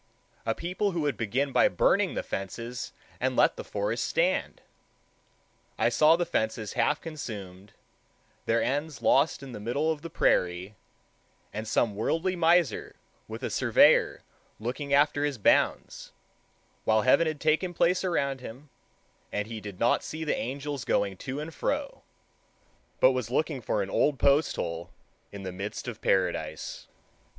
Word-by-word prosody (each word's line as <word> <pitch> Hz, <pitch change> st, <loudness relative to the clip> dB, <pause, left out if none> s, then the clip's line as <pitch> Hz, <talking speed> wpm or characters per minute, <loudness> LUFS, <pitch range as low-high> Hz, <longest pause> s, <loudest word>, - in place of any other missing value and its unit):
A -, -, +1 dB
people 180 Hz, +3 st, -2 dB
who 170 Hz, -, -1 dB
would 145 Hz, -4 st, 0 dB
begin 125 Hz, +6 st, -1 dB
by -, -, +5 dB
burning -, -, +2 dB
the -, -, -2 dB
fences 115 Hz, +5 st, -5 dB, 0.3 s
and -, -, 0 dB
let -, -, +4 dB
the -, -, -6 dB
forest 105 Hz, +3 st, -2 dB
stand! 180 Hz, +3 st, 0 dB, 1.2 s
I -, -, +3 dB
saw 155 Hz, +1 st, +5 dB
the 175 Hz, +1 st, 0 dB
fences 110 Hz, -, -2 dB
half 135 Hz, +5 st, +1 dB
consumed, 100 Hz, -, -8 dB, 0.7 s
their 115 Hz, +1 st, +2 dB
ends 145 Hz, +2 st, -2 dB
lost 140 Hz, +1 st, +3 dB
in 135 Hz, -, -8 dB
the 110 Hz, -, -7 dB
middle 140 Hz, +9 st, 0 dB
of 155 Hz, -2 st, -4 dB
the 165 Hz, -, -7 dB
prairie, 90 Hz, -, +1 dB, 0.8 s
and 110 Hz, +1 st, -5 dB
some 110 Hz, -1 st, +1 dB
worldly 165 Hz, -, 0 dB
miser 170 Hz, -2 st, +2 dB, 0.3 s
with -, -, -8 dB
a -, -, -2 dB
surveyor -, -, +4 dB, 0.4 s
looking 130 Hz, +6 st, -4 dB
after 145 Hz, +1 st, +3 dB
his 145 Hz, -3 st, -1 dB
bounds, 105 Hz, -, +1 dB, 0.7 s
while 110 Hz, -1 st, +3 dB
heaven 160 Hz, +6 st, +4 dB
had 155 Hz, -2 st, -3 dB
taken 160 Hz, +5 st, +1 dB
place 180 Hz, +2 st, +2 dB
around 140 Hz, -7 st, 0 dB
him, 130 Hz, +4 st, -10 dB, 0.6 s
and 105 Hz, -, -2 dB
he 110 Hz, -1 st, -6 dB
did 100 Hz, -3 st, -9 dB
not 120 Hz, -, +2 dB
see 160 Hz, +1 st, -5 dB
the 150 Hz, -, 0 dB
angels 140 Hz, +2 st, -4 dB
going 100 Hz, -1 st, 0 dB
to 130 Hz, +7 st, -5 dB
and 155 Hz, +2 st, -6 dB
fro, 285 Hz, 0 st, -2 dB, 1.0 s
but -, -, +6 dB
was -, -, -2 dB
looking -, -, -1 dB
for -, -, 0 dB
an -, -, -6 dB
old 145 Hz, -2 st, +2 dB
post 140 Hz, +4 st, +3 dB
hole 85 Hz, +1 st, -4 dB, 0.4 s
in 100 Hz, -1 st, -8 dB
the 95 Hz, -, -4 dB
midst 100 Hz, +6 st, -6 dB
of 115 Hz, -2 st, -6 dB
paradise. 85 Hz, -5 st, -1 dB
135 Hz, 155 wpm, -28 LUFS, 105-160 Hz, 1.2 s, but